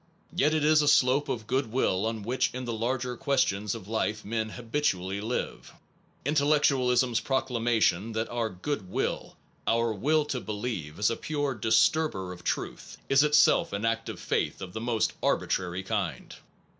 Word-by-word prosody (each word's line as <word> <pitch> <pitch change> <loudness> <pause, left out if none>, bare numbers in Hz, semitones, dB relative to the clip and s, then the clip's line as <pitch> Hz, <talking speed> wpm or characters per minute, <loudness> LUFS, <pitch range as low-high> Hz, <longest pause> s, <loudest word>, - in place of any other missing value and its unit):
Yet 155 -2 +3
it 155 - +1
is 155 0 +5
a 150 - 0
slope 135 +1 +4
of 110 -3 -3
good 130 0 -1
will 110 -5 +1
on 110 -2 -3
which 125 +5 0
in 130 0 -4
the 120 - -3
larger 125 +2 -2
questions 115 -7 0
of 95 - -9
life 110 -1 -2
men 110 +1 -2
habitually 105 -6 -2
live. 115 +4 -4 0.5
Intellectualism 140 -4 +3
s 115 - +1
proclamation 115 -5 +1
that 110 +1 -1
our 120 -2 -1
good 100 +1 -4
will, - - -2 0.3
our 115 0 +2
will 150 +9 +1
to 135 -3 -3
believe, 105 -7 -4
is 105 +2 +2
a - - -1
pure 145 -1 -2
disturber 110 -2 +2
of 90 - -13
truth, - - -4
is 135 0 +5
itself 150 -6 +4
an 100 +2 -2
act 115 0 -1
of - - -6
faith - - -1
of 95 -2 -8
the 110 - -4
most 115 -2 0
arbitrary 90 +1 0
kind. - - -3
115 Hz, 170 wpm, -28 LUFS, 105-135 Hz, 0.5 s, is